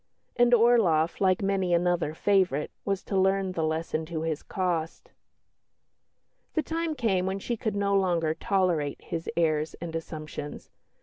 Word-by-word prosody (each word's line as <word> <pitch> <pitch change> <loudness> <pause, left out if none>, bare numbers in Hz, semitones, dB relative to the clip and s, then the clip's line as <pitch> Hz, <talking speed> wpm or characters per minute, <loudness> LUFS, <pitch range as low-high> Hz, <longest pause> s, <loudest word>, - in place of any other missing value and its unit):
And 240 0 +4
Orloff, 220 -10 +4
like 185 0 +3
many 190 -3 +1
another 175 -3 0
favourite, 185 -7 +1
was 195 -1 -2
to 200 - -4
learn 190 0 +2
the 165 -3 -2
lesson 160 0 -1
to 160 -1 -3
his 160 -2 -2
cost. 170 -4 -3 1.4
The 315 - +1
time 325 +1 -2
came 195 -8 +1
when 190 +1 -1
she 235 +4 -3
could 220 -2 -3
no 200 0 +1
longer 170 -5 +2
tolerate 175 -7 0
his 165 0 -4
airs 155 -2 +1
and 165 -1 -7
assumptions. 155 -2 -7
180 Hz, 145 wpm, -27 LUFS, 160-200 Hz, 1.4 s, And